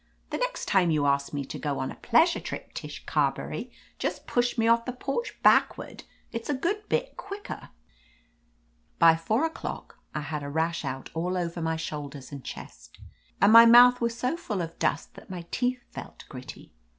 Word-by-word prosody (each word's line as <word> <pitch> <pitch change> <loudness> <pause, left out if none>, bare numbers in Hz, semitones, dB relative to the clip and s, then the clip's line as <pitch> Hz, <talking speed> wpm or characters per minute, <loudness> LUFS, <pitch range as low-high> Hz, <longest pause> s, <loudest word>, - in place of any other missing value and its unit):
The - - -2
next - - -2
time 185 -3 +3
you 150 -3 +2
ask 140 0 +1
me 140 -2 -3
to - - -7
go 145 -2 -2
on 130 - -3
a - - -9
pleasure 320 +9 +3
trip, - - -7
Tish - - -7
Carberry, - - -1 0.3
just - - -3
push 245 0 0
me 225 0 +2
off 230 0 +4
the 250 - -3
porch 275 - -4
backward. - - +3 0.3
It's 230 +2 -5
a 290 - +1
good 405 +10 -2
bit - - -1
quicker." 405 +1 -7 1.3
By 165 -1 +7
four 215 - 0
o'clock 325 - -6 0.2
I 150 - -1
had 150 0 -4
a 140 - -5
rash 160 +3 -1
out 135 -1 -5
all 180 +3 -1
over 170 -1 -3
my 160 0 0
shoulders 145 -4 -6
and 140 -2 -8
chest, - - -10 0.4
and 205 +2 +6
my 230 0 +11
mouth 245 +1 +8
was 235 0 0
so 250 +6 0
full 215 - -3
of 165 0 -8
dust 145 - -1
that - - -14
my 180 -2 -6
teeth 250 0 -1
felt - - -9
gritty. 130 -2 -10
185 Hz, 185 wpm, -27 LUFS, 150-245 Hz, 1.3 s, my